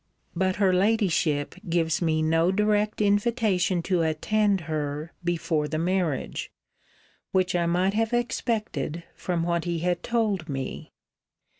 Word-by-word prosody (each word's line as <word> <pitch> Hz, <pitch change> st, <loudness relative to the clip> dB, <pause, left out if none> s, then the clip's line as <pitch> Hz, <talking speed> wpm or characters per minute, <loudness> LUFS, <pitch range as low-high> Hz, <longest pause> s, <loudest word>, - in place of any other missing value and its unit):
But 185 Hz, +1 st, +1 dB
her 195 Hz, -3 st, +3 dB
Ladyship 180 Hz, -7 st, +1 dB, 0.2 s
gives 165 Hz, -1 st, +1 dB
me 155 Hz, -2 st, +1 dB
no 165 Hz, +3 st, +3 dB
direct 210 Hz, +1 st, +1 dB
invitation 205 Hz, -4 st, +2 dB
to 180 Hz, -2 st, +1 dB
attend 195 Hz, +5 st, +1 dB
her 155 Hz, -1 st, -4 dB
before 165 Hz, -3 st, 0 dB
the 155 Hz, +1 st, -2 dB
marriage: 170 Hz, -4 st, -1 dB, 0.8 s
which 185 Hz, -1 st, +1 dB
I 170 Hz, -1 st, +1 dB
might 180 Hz, +3 st, +2 dB
have 225 Hz, +1 st, 0 dB
expected 220 Hz, -, -2 dB
from 175 Hz, -2 st, -2 dB
what 170 Hz, 0 st, 0 dB
he 170 Hz, -1 st, -1 dB
had 175 Hz, -1 st, 0 dB
told 210 Hz, -8 st, -1 dB
me. 135 Hz, -1 st, -5 dB
180 Hz, 130 wpm, -26 LUFS, 160-205 Hz, 0.8 s, her